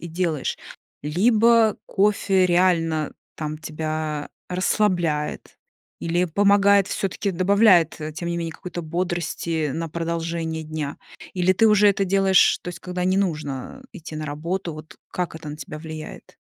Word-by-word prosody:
и 170 - -7
делаешь. 165 -3 -2 0.5
Либо 220 +7 +4
кофе 195 -2 +2
реально, 165 -4 +2 0.2
там, 155 -1 -5
тебя 155 -1 -4 0.2
расслабляет 180 -5 0 0.4
или 175 +2 0
помогает 200 +2 +4
всё-таки, 195 +1 -2
добавляет, 185 -3 +4
э, 155 0 -5
тем 170 +2 -5
не 170 - -2
менее, 165 -1 -3
какой-то 175 +1 -7
бодрости 170 -2 -2
на 165 0 -3
продолжение 165 0 -3
дня? 155 -2 -5 0.4
Или 180 0 +3
ты 220 +4 +4
уже 210 -1 +6
это 195 0 +2
делаешь, 195 0 +4
то - - -6
есть 175 - -6
когда 180 0 -3
не 185 +1 +2
нужно 155 - -3
идти 165 -5 -9
на 155 - -4
работу? 165 +4 -3
Вот 155 +4 -11
как 180 -2 -3
это 160 -2 -8
на 150 - -6
тебя 155 0 -8
влияет? 155 -1 -9
170 Hz, 145 wpm, -23 LUFS, 155-190 Hz, 0.5 s, уже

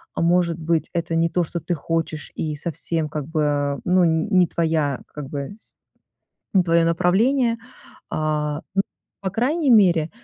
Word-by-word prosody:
а - - -1
может 170 -1 +2
быть, 160 0 0
это 170 -1 -1
не 165 0 +2
то, 175 +1 +1
что 170 +1 -4
ты 175 - -2
хочешь, 160 0 -3
и 155 -1 -2
совсем, 160 0 -3
как 150 -2 -4
бы, 145 -3 0
ну, 180 0 +4
н 160 -1 +2
не 180 -2 +4
твоя, 160 -5 0
как 145 -3 -7
бы 140 +1 -5
с 225 - -19 0.8
не 190 -2 +5
твоё 165 -1 +3
направление. 230 +9 +2 0.5
А, 150 -1 -1 0.2
м, 195 - +4 0.4
по 190 -1 -2
крайней 270 - +1
мере, 175 -8 +5
165 Hz, 165 wpm, -22 LUFS, 155-180 Hz, 0.8 s, не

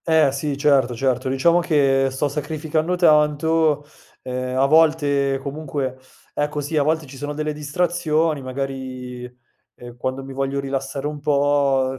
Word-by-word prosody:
Eh 160 -4 +4
sì, 140 +1 -3
certo 135 -4 +3
certo. 130 +1 0
Diciamo 170 +7 +3
che 135 -5 +2
sto 135 +3 -1
sacrificando 155 +3 -2
tanto, 155 -2 +3 0.4
ehm, 130 0 -3
a 135 - +4
volte 145 -3 +3
comunque 140 -3 -4 0.3
ecco 150 0 -2
sì, 145 +2 -4
a 150 - +3
volte 155 +2 0
ci 135 0 -12
sono 145 +2 -4
delle 155 0 -2
distrazioni, 155 0 0
magari, 130 -1 -5 0.5
ehm, 120 0 -12
quando 130 +2 -3
mi 135 0 -8
voglio 135 +1 -2
rilassare 135 0 -4
un 150 0 -3
po', 140 -2 +2
140 Hz, 145 wpm, -21 LUFS, 135-155 Hz, 0.5 s, Eh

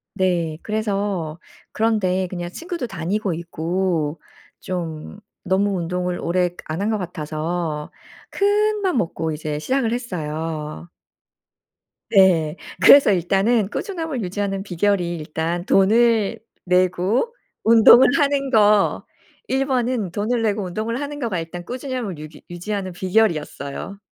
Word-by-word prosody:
네. 175 -5 0
그래서 200 -6 -2 0.3
그런 220 0 +1
데에 185 -1 0
그냥 175 -1 -5
친구도 335 - -5
다니고 190 +2 -2
있고 170 -1 -2 0.4
좀 170 +1 -5 0.2
너무 195 +1 +1
운동을 180 +1 -2
오래 180 +1 +1
그 175 - -23
안 160 +5 -3
한 210 - 0
것 220 - +1
같아서 160 -2 -4 0.4
큰맘 410 -3 +1
먹고 165 -5 -1
이제 150 -1 -4
시작을 255 - 0
했어요. 160 -7 -4 1.2
네. 175 -6 +4 0.3
그래서 275 +3 +8
일단은 195 +4 +2
꾸준함을 320 - -4
유지하는 195 +1 -2
비결이 180 -2 0
일단 160 +3 -3
돈을 220 +1 +3 0.3
내고 185 - +1 0.3
운동을 230 +2 +8
하는 280 -1 +1
거 210 -4 +3 0.4
1 270 +1 +1
번은 245 -7 -1
돈을 220 +5 -1
내고 210 -2 0
운동을 220 +6 -3
하는 290 0 -5
거가 225 -9 -2
일단 170 +2 -7
꾸준함을 250 - -4
유기 155 +1 -11
유지하는 185 +2 -4
비결이었어요. 180 -3 -1
190 Hz, 265 characters per minute, -21 LUFS, 170-225 Hz, 1.2 s, 그래서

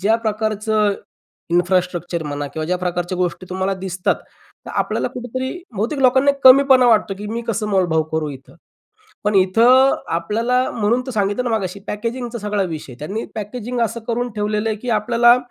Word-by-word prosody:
ज्या 215 +4 +3
प्रकारचं 215 -1 0 0.6
इन्फ्रास्ट्रक्चर 175 -1 0
म्हणा 145 -1 -4
किंवा 155 -1 -3
ज्या 180 +1 0
प्रकारच्या 180 0 -2
गोष्टी 180 +1 -2
तुम्हाला 190 +1 -1
दिसतात 185 -1 -1 0.5
तर - - -7
आपल्याला - - 0
कुठेतरी 255 +2 -4 0.2
बहुतेक 230 +9 -2
लोकांना 265 +2 +4
कमीपणा 260 -1 +7
वाटतो, 215 -3 +3
की 210 +1 -6
मी 230 +1 -3
कसं 215 -1 -1
मोलभाव 175 -5 +2
करू 160 -1 -1
इथं? 135 +3 -12 0.7
पण 210 0 +1
इथं 235 +8 +5 0.2
आपल्याला 230 +8 0
म्हणून 230 +2 0
तर 260 - -4
सांगितलं 205 +3 0
ना 225 - +2
मगाशी 195 -1 -4
पॅकेजिंग 235 +4 -3
चा 235 - -5
सगळा 210 -1 -1
विषय 160 -7 -5
आहे. 120 - -14
त्यांनी 200 +9 -4
पॅकेजिंग 240 +3 -4
असं 230 +1 -2
करून 240 +1 -1
ठेवलेलं 210 +1 -1
आहे 215 - -1
की 245 +3 -4
आपल्याला, 235 +2 +4
210 Hz, 170 wpm, -20 LUFS, 185-235 Hz, 0.7 s, कमीपणा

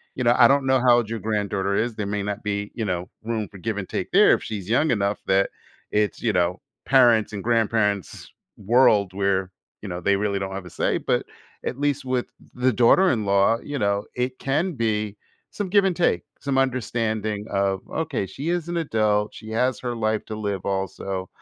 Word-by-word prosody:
You 125 - -2
know? 120 0 +4
I 120 - +8
don't 140 +1 +3
know 130 0 +4
how 120 -1 +5
old 115 -3 -1
your 115 0 -3
granddaughter 100 -2 -1
is 115 +2 0
there 105 - -3
may 100 +1 -2
not 105 +1 -4
be, 105 0 -3
you 115 - -2
know, 90 -2 -3
room 110 -2 -2
for 100 - -12
give 110 +3 -3
and 95 -2 -5
take - - -3
there - - +6
if - - -7
she's 100 -3 -6
young 140 +7 +3
enough 100 -3 0
that 95 +1 +2 0.4
it's, 105 0 0
you 115 - +1
know, 90 0 0 0.2
parents' 120 -5 +4
and 100 -2 -5
grandparents' 110 -4 0 0.3
world 105 -2 +4
where, 95 -1 0 0.3
you 105 - -7
know, 90 0 -4
they 100 +3 +2
really 100 0 -1
don't 95 0 -4
have 95 -1 -6
a - - -9
say, - - 0
but - - -1 0.4
at 130 - -3
least 145 -1 0
with 130 -1 -1
th - - -22
the 125 0 +1
daughter-in-law, 110 - +4
you 145 -1 -4
know, 100 -1 0
it 125 +1 -2
can 155 +7 0
be 110 -5 -1 0.3
some 205 - -4
give 200 +1 +4
and 185 -2 +1
take, 175 - +1 0.2
some 140 -1 -1
understanding 110 -4 -1
of, 100 -1 0
okay 155 -10 -2
she 140 - -5
is 175 -2 -1
an 175 - -2
adult, 110 -9 +1
she 110 0 -10
has 125 +1 +1
her 120 -1 -3
life 110 -1 0
to 110 - -6
live 100 -3 -3
also. 95 -1 -3
110 Hz, 205 wpm, -24 LUFS, 100-125 Hz, 0.4 s, I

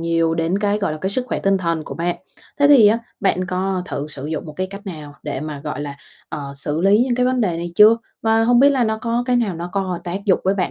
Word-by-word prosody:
nhiều 165 -1 +1
đến 165 +4 0
cái, 205 0 0
gọi 200 - -1
là, 155 - -5
cái 190 - -1
sức 250 +5 -1
khỏe - - -2
tinh 195 -1 +2
thần 165 -3 -2
của - - -7
bạn. 175 +1 -2 0.4
Thế 285 - +5
thì 265 -7 +7
á, 215 +3 +4 0.2
bạn 185 -2 +1
có 185 0 -1
thử 145 - -4
sử 145 -2 -7
dụng 155 0 -4
một 155 - -8
cái 185 +5 -3
cách 200 +1 -10
nào 150 -6 -8
để 145 -3 -4
mà, 150 -2 -6
gọi 150 0 -5
là, 145 -1 -6 0.3
ờ, 140 -2 -6
xử 150 +3 -1
lý 195 +3 +4
những 250 -2 0
cái 250 0 +1
vấn 255 -1 +1
đề 180 -6 0
này 170 0 -5
chưa? 215 +4 +7 0.3
Và 225 0 +3
hông 245 +1 +4
biết 280 +1 +6
là 260 -4 +2
nó 220 0 -1
có 235 +1 -1
cái 250 - +2
nào 225 -6 0
nó 170 +1 -5
có 190 -3 -2
tác 185 +3 -4
dụng 195 -4 +3
với 190 - +2
bạn 185 -3 -1
185 Hz, 285 wpm, -20 LUFS, 165-220 Hz, 0.4 s, thì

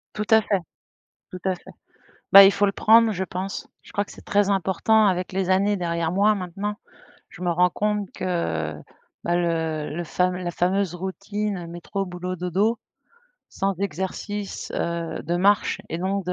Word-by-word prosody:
Tout 210 - -2
à 220 0 +6
fait. 200 -3 0 0.7
Tout 185 - -7
à 190 -1 +1
fait. 180 - -14 0.6
Bah 195 0 +12
il 195 - +6
faut 205 +1 +2
le 195 - 0
prendre 225 +1 +5
je 190 0 -2
pense, 185 +2 -5 0.2
je - - -16
crois 205 - 0
que - - -14
c'est - - -14
très 205 0 +2
important 200 +3 +3
avec 185 -1 0
les 190 -1 -1
années 200 +2 +3
derrière 170 -2 -1
moi 205 +3 +4
maintenant, 195 +2 -4 0.6
je - - -13
me 180 - 0
rends 180 +1 +3
compte 210 -1 -1
que 80 - -2 0.5
bah 175 - +1
le 160 -3 -1
le 175 - -3
fam 180 +2 0
la 180 -1 -3
fameuse 185 +1 0
routine 195 +1 -4
métro 175 +3 -4
boulot 180 0 -5
dodo 190 +7 0 0.7
sans 195 0 -1
exercice, 200 +2 -4
heu, 170 -1 -3
de 175 +1 -1
marche 200 +2 +2
et 165 - -3
donc 190 +1 -1
de 180 - 0
190 Hz, 175 wpm, -24 LUFS, 175-200 Hz, 0.7 s, Bah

